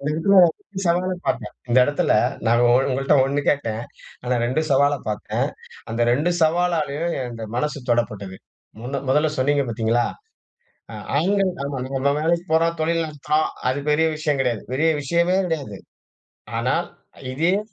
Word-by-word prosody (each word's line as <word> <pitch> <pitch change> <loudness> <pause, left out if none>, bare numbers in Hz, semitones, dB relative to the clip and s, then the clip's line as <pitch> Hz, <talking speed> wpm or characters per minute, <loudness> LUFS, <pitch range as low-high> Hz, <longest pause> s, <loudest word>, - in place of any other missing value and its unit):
இந்த 140 - -3
இடத்துல 165 +6 +2
ஒரு 190 +4 -6
சவால 180 +2 +1
பாத்தேன். 105 -5 -2 0.2
இந்த 120 +2 +4
இடத்துல 145 +2 0 0.4
நான் 120 +1 +4
ஒ 120 - +4 0.2
ஒங்கள்ட்ட 135 +2 +1
1 140 +2 0
கேட்டேன், 115 -6 0 0.4
ஆனா 125 0 0
2 130 +6 0
சவால 140 +1 +4
பாத்தேன். 105 -1 -2 0.4
அந்த 115 +1 -2
2 145 +8 +2
சவாலாலையும் 165 -1 +1
என் 130 -2 -3
இந்த 115 -1 -7
மனசு 150 +4 -1
தொடப்பட்டது. 105 -5 -1 0.5
முன்ன 135 +3 -4
மொதல 150 +3 +3
சொன்னீங்க 140 +2 +2
பாத்தீங்களா, 115 +1 +1 1.1
ஆண்கள் 195 +5 +2
நம்ம 140 -1 -3
நம்ம 135 +1 +1
வேலைக்கு 170 +2 +1
போறோம், 165 +1 +2
தொழில் 165 +1 +1
நடத்துறோம், 150 +1 -1 0.2
அது 130 - -2
பெரிய 155 +2 +3
விஷயம் 150 -2 -1
கெடையாது, 120 -4 -1
பெரிய 155 +5 +2
விஷயமே 170 +5 +1
கிடையாது. 140 - -4 0.8
ஆனா, - - +1 0.6
இதையே 170 +7 +2
145 Hz, 145 wpm, -22 LUFS, 125-165 Hz, 1.1 s, இந்த